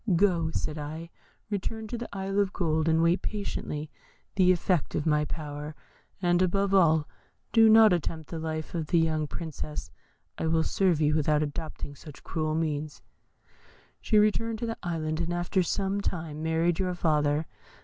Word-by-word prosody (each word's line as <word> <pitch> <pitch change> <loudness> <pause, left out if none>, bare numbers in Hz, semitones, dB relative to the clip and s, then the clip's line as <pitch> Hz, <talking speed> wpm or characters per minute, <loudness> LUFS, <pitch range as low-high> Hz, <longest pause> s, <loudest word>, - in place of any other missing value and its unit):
'Go,' 170 -3 +3
said 155 -1 -3
I, 160 +3 -6 0.4
'return 220 +2 -3
to 245 - -3
the 235 0 -5
Island 195 0 -2
of 200 -1 +1
Gold, 160 -2 +1
and 160 +1 +3
wait 170 +3 +3
patiently 155 -7 -4 0.4
the 185 -2 +5
effect 180 -2 0
of 150 - -1
my 150 -1 +2
power, 150 0 -6 0.5
and 175 0 +3
above 195 +2 +1
all, 160 -5 +4 0.5
do 225 -1 +7
not 220 -2 +8
attempt 160 -2 -3
the 165 - -4
life 155 -1 -4
of 165 -3 -2
the 170 - +2
young 155 -2 +1
Princess; 150 - -6 0.5
I - - 0
will 160 0 +2
serve 180 -4 +1
you 150 0 +3
without 150 0 +2
adopting 150 0 -5
such 145 +1 -12
cruel 155 -1 -2
means.' 155 -2 -2 1.0
"She 215 - +2
returned 220 +2 +2
to 235 - -3
the 225 0 -3
Island, 160 -2 -2
and 170 0 -2
after 175 +2 0
some 195 +2 -1
time, 160 -5 -4
married 160 +1 +1
your 180 -1 0
father. 150 -2 +1
165 Hz, 170 wpm, -28 LUFS, 155-190 Hz, 1.0 s, not